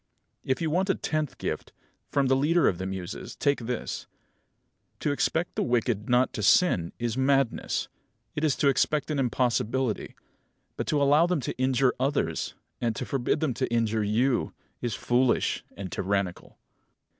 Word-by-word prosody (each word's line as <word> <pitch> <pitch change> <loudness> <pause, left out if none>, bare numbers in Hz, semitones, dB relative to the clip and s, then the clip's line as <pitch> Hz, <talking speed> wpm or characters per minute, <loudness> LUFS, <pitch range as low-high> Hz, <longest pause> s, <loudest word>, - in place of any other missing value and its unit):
If 130 +5 -1
you 160 - 0
want 185 +4 +1
a 195 - +3
tenth 155 -3 -2
gift, - - -4 0.4
from 140 -1 +2
the 135 0 +3
Leader 160 +6 +3
of 90 - +1
the 95 - -3
Muses, 95 -2 -6
take 140 0 +1
this: 120 +1 -4 0.9
To 145 - +1
expect 160 +4 0
the - - -1
wicked 120 -3 0
not 125 +1 +3
to - - -3
sin 100 - +4
is 120 +1 -2
madness. 135 -2 +1 0.5
It 150 - -3
is 150 -4 +3
to 145 - +1
expect 150 +2 +2
an 145 - 0
impossibility. 125 -2 0 0.6
But - - -4
to 150 - +2
allow 145 +4 +5
them 180 -3 +1
to - - -4
injure 130 0 +3
others, 130 - -1 0.3
and 115 -2 0
to - - -3
forbid 135 +2 0
them 150 -5 +1
to 115 - -2
injure 115 -2 +1
you, 120 +5 +1 0.3
is 120 -5 -2
foolish 125 +1 +1
and 95 -2 -6
tyrannical. 100 -2 -2
130 Hz, 165 wpm, -27 LUFS, 115-145 Hz, 0.9 s, allow